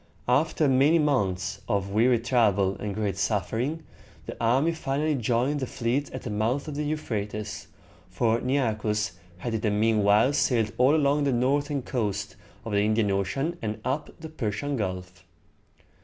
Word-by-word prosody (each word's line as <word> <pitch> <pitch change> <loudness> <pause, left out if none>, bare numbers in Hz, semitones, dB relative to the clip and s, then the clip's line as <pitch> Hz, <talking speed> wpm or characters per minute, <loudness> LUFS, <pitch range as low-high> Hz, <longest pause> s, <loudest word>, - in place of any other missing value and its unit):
After 150 +4 +2
many 140 +5 +4
months 100 - 0
of 100 -2 0
weary 120 +4 +4
travel 105 -5 +2
and 105 -2 -4
great 105 -3 -2
suffering, 115 - -1 0.4
the - - -6
army 130 +8 +3
finally 155 -1 -1
joined 125 +3 0
the 130 - -3
fleet 125 +6 -2
at 130 - -7
the 120 - -4
mouth 115 +8 -1
of 150 - -4
the 145 - -3
Euphrates, 110 -8 -4 0.4
for 115 +5 +1
Nearchus 110 -6 0 0.3
had 115 +5 -4
in 110 - -1
the 110 - +1
mean 105 +1 +2
while 105 +7 +4
sailed 115 -6 +1
all 130 +4 +5
along 145 -1 +2
the 140 - +2
northern 140 +3 0
coast 110 -7 -2 0.3
of 115 - -4
the 100 0 +2
Indian 110 -1 +2
Ocean 135 - -1
and 110 -1 -3
up 135 +4 -2
the 160 0 -8
Persian 140 0 -3
Gulf. 90 -4 -4
115 Hz, 160 wpm, -26 LUFS, 105-140 Hz, 0.4 s, all